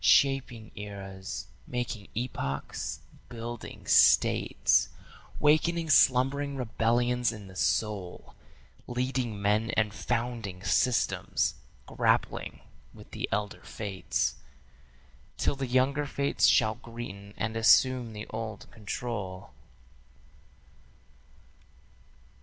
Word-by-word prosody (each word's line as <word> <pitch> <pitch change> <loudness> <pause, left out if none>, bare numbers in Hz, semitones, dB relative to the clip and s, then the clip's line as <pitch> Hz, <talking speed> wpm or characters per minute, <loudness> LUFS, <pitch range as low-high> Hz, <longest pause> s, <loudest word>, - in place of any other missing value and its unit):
Shaping 120 +2 +3
eras, 95 -2 -7 0.2
making 120 -4 -4
epochs, 70 - -3 0.3
building 120 -1 -7
States, - - +4 0.5
Wakening 160 +2 +3
slumbering 140 +2 +4
rebellions 120 0 +1
in 105 -2 -9
the 95 -1 -13
soul, 100 -2 -1 0.5
Leading 125 -3 -2
men 105 +3 +1
and 105 -2 +2
founding 115 -6 -3
systems, 115 +7 +1 0.3
grappling - - 0 0.3
with - - -14
the - - -3
elder 105 0 -2
fates 100 -3 -2 1.0
Till - - +1
the 135 -1 -3
younger 135 +4 +2
fates 140 0 +2
shall 110 - +4
greaten 105 -4 -8
and 110 +1 -2
assume 120 +1 +4
the 105 0 -6
old 110 -2 -5
control. 100 -4 -5
115 Hz, 90 wpm, -29 LUFS, 105-125 Hz, 1.0 s, States